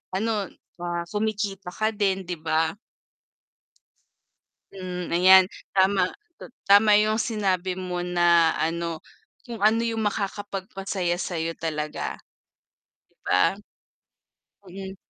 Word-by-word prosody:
ano 210 -1 -1 0.3
ah, 175 0 -3
kumikita 210 -3 -2
ka 215 +4 -1
din 195 -2 0
'di 175 -2 -5
ba? 160 +1 0 2.0
Hmm 180 -2 -6
ayan 185 +1 +7 0.3
tama, 190 -1 +3 0.3
ta - - -10 0.2
tama 205 +1 +6
yung 215 +1 +2
sinabi 190 -4 -1
mo 180 -1 -3
na 175 -2 +4
ano 165 0 -2 0.5
kung 230 -4 -8
ano 225 +2 +3
yung 225 -1 -1
makakapagpasaya 195 -3 -3
sa'yo 165 -2 -3
talaga. 155 -2 -4 1.1
'Di - - -2
ba? 90 - +3 1.2
Mm. 190 +1 -8
190 Hz, 105 wpm, -25 LUFS, 175-205 Hz, 2.0 s, ayan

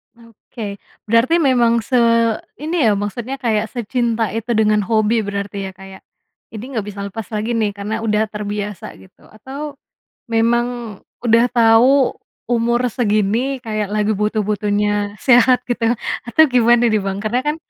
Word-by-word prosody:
Oke, 225 -3 -9 0.3
berarti 230 +9 +3
memang 235 -5 +3
se 250 +1 0 0.6
ini 320 +3 -3
ya - - +4
maksudnya 235 +6 -4
kayak 225 -3 0
secinta 235 -1 -1
itu 230 +1 -3
dengan 215 -1 +3
hobi 220 0 +2
berarti 200 -1 -4
ya, 190 - -7
kayak 195 0 -12 0.5
ini 220 0 -7
nggak 215 -3 -2
bisa 200 -1 -7
lepas 220 -2 -6
lagi 215 +1 -3
nih 220 -2 +1
karena 210 +2 -4
udah 215 -1 +1
terbiasa 210 -2 -5
gitu 95 0 -20
atau, 275 +7 -8 0.6
memang 235 -1 0 0.3
udah 230 +1 +5
tau 245 +3 +4 0.3
umur 240 +1 +1
segini 230 +3 0
kayak 215 -4 -4
lagi 215 0 +1
butuh-butuhnya 205 0 -1
sehat 250 0 +5
gitu 235 -2 0 0.4
atau 245 +6 +4
gimana 240 -2 +3
nih, 215 -2 +1
Bang? 195 0 -3
Karena 220 +4 -1
kan 300 - 0
225 Hz, 140 wpm, -18 LUFS, 210-240 Hz, 0.6 s, udah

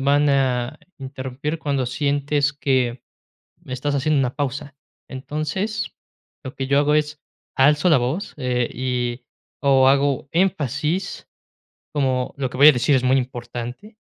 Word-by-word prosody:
van 145 +2 +3
a 130 -3 0 0.2
interrumpir 135 +3 -5
cuando 140 -4 -1
sientes 145 +2 0
que, 130 -4 0 0.6
me - - -9
estás 140 +3 -2
haciendo 145 +2 +1
una 130 -2 0
pausa. 140 0 -4 0.3
Entonces, 155 +11 -3 0.5
lo 130 +1 -7
que 135 - -3
yo 140 +1 +3
hago 145 +1 +3
es, 150 -1 0 0.4
alzo 150 +5 +4
la 155 - +6
voz, 130 - -2
eh, 125 -3 -1
y 125 -1 -2 0.4
o 135 -1 +5
hago 140 -1 +2
énfasis, 165 - -1 0.7
como 130 -3 0
lo 130 -2 -2
que 125 - -8
voy 145 +3 +8
a - - +9
decir 135 +2 +2
es 130 - +1
muy 130 +1 +4
importante, 125 - -6
140 Hz, 145 wpm, -22 LUFS, 130-150 Hz, 0.7 s, a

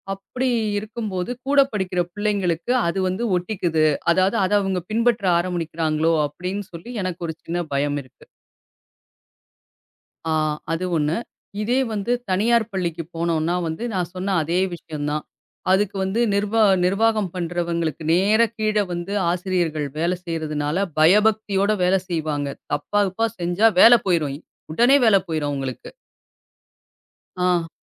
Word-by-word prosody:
அப்படி 250 +7 -3 0.3
இருக்கும்போது, 215 -2 -4 0.2
கூடப் 275 -1 +4
படிக்கிற 185 -3 -2
பிள்ளைங்களுக்கு 200 -2 -1 0.2
அது 190 +3 -1
வந்து 190 +6 -3
ஒட்டிக்குது. 175 -4 0 0.3
அதாது 190 +5 +2
அதை 205 +2 +1
அவுங்க 190 -2 -1
பின்பற்ற 230 -2 +1
ஆரம்பிக்கிறாங்களோ! 165 -2 0
அப்படின்னு 180 +7 -5
சொல்லி 170 +9 -9
எனக்கு 180 -2 -4
ஒரு 160 - -5
சின்னப் 170 -2 -4
பயம் 145 +1 0
இருக்கு. 130 - -21 2.0
ஆ, 160 - 0 0.4
அது 165 +3 -1
1. 150 +4 0 0.4
இதே 240 +4 +1
வந்து 215 +2 -2 0.2
தனியார் 225 +4 +2
பள்ளிக்குப் 170 -3 -3
போனோன்னா 165 0 0
வந்து, 160 +8 -4
நான் 180 -2 -2
சொன்ன 190 +2 -2
அதே 170 +4 0 0.2
விஷயம் 155 -3 -6
தான். 150 0 -2 0.5
அதுக்கு 200 +1 +2
வந்து 190 +4 -1
நிர்வா 210 +2 +1 0.2
நிர்வாகம் 215 0 +2
பண்றவங்களுக்கு 170 -2 -2
நேர, 200 +6 +3 0.2
கீழ 215 -1 0 0.2
வந்து 175 +3 -4 0.2
ஆசிரியர்கள் 175 -5 -1
வேலை 175 +3 0
செய்யறதுனால 160 +2 -1
பயபக்தியோடு 205 +3 +3
வேலை 185 +1 +3
செய்வாங்க. 155 -4 -2 0.3
தப்பா 175 +8 0
கிப்பா 225 +5 0
செஞ்சா 175 +6 +3
வேலை 235 0 +9
போயிரும். 150 -6 +1 0.4
உடனே 240 - +5
வேலை 200 -3 +6
போயிரும் 155 -3 -1
அவுங்களுக்கு. 135 -3 -5 1.6
ஆ. 175 -2 +1
180 Hz, 125 wpm, -22 LUFS, 165-205 Hz, 2.0 s, வேலை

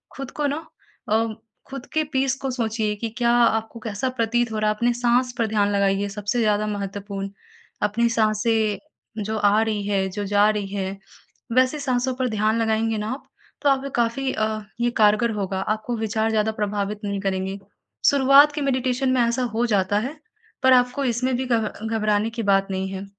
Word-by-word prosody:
खुद 275 -1 -6
को 295 - +2
न 310 - -4 0.5
अ 225 +1 +3 0.4
खुद 270 -2 -7
के 315 - +2
पीस 265 0 +1
को 270 - -2
सोचिए 220 -3 -1
कि 225 +2 -4
क्या 235 -1 +2
आपको 230 -1 +2
कैसा 220 +3 -3
प्रतीत 240 -1 0
हो 215 - -2
रहा 215 0 +2
है, - - -2
अपने 240 +3 +1
साँस 245 +1 +1
पर 230 - +2
ध्यान 205 -2 +1
लगाइए 200 0 +1
सबसे 210 +3 -2
ज़्यादा 210 -1 +1
महत्वपूर्ण। 200 -1 -4 0.5
अपनी 235 +3 +2
साँसें 220 -1 +1 0.5
जो 220 +2 -2
आ 205 +1 +3
रही 215 -2 -2
है, 195 -2 +1
जो 205 +2 -4
जा 205 +1 +4
रही 210 -2 -1
है 195 0 -3 0.6
वैसे 255 +4 +3
साँसों 260 -2 0
पर 255 0 -1
ध्यान 215 0 +1
लगाएँगे 220 0 +1
न 210 - -3
आप 255 +6 -4 0.4
तो 290 - +3
आप 270 0 +1
काफ़ी 240 +3 0
अ, 215 0 -1 0.2
ये 240 - +3
कारगर 215 +2 +4
होगा 195 -1 -2
आपको 215 +4 -2
विचार 220 0 0
ज़्यादा 220 0 +1
प्रभावित 210 -1 -2
नहीं 200 -1 -2
करेंगे 190 0 -2 0.5
शुरुआत 280 +1 +6
की 295 - -3
मेडिटेशन 260 -1 0
में 255 - +3
ऐसा 235 +2 +1
हो 235 +2 +2
जाता 205 -1 +2
है 265 +7 -4 0.5
पर 260 0 +6
आपको 250 +2 +2
इसमें 250 +1 0
भी 260 - -2
घब 230 -3 +1 0.2
घबराने 215 -1 +1
की 230 0 -4
बात 195 -1 +3
नहीं 190 0 -2
है। 190 +1 -5
220 Hz, 190 wpm, -23 LUFS, 205-245 Hz, 0.6 s, शुरुआत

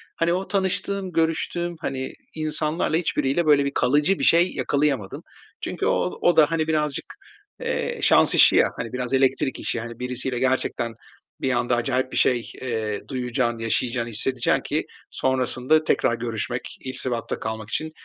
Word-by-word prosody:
hani, 170 +1 +1
o 185 +2 -2
tanıştığım, 195 -1 -1
görüştüğüm, 170 +1 0
hani, 130 0 -3 0.2
insanlarla 155 +1 -1
hiçbiriyle 165 -1 0
böyle 145 -2 +4
bir 140 - -1
kalıcı 150 +8 +2
bir - - -2
şey 170 +2 +4
yakalayamadım. 140 -8 -1 0.4
Çünkü - - -3
o - - 0
o 175 -2 +3
da 150 0 +6
hani, 160 -1 0
birazcık, 150 -3 -1 0.5
eee, - - -2
şans - - +5
işi - - +7
ya, - - +5
hani, 115 +1 -5
biraz 125 0 -3
elektrik 135 0 +1
işi. 120 - -2
Hani, 115 +1 -8
birisiyle 125 0 -2
gerçekten 125 -3 0 0.5
bir 130 - +1
anda 120 0 +1
acayip 130 +2 -1
bir - - -3
şey, 120 -2 +2
eee, 110 -4 -2
duyacaksın, 125 -2 -1
yaşayacağın, 120 +1 0
hissedeceksin 120 +2 +2
ki - - -2 0.3
sonrasında 130 +3 +1
tekrar 120 -5 +2
görüşmek, 120 +1 -4
irtibatta 125 -2 -4
kalmak 110 -1 -5
için, 155 +7 -3
130 Hz, 155 wpm, -24 LUFS, 120-155 Hz, 0.5 s, işi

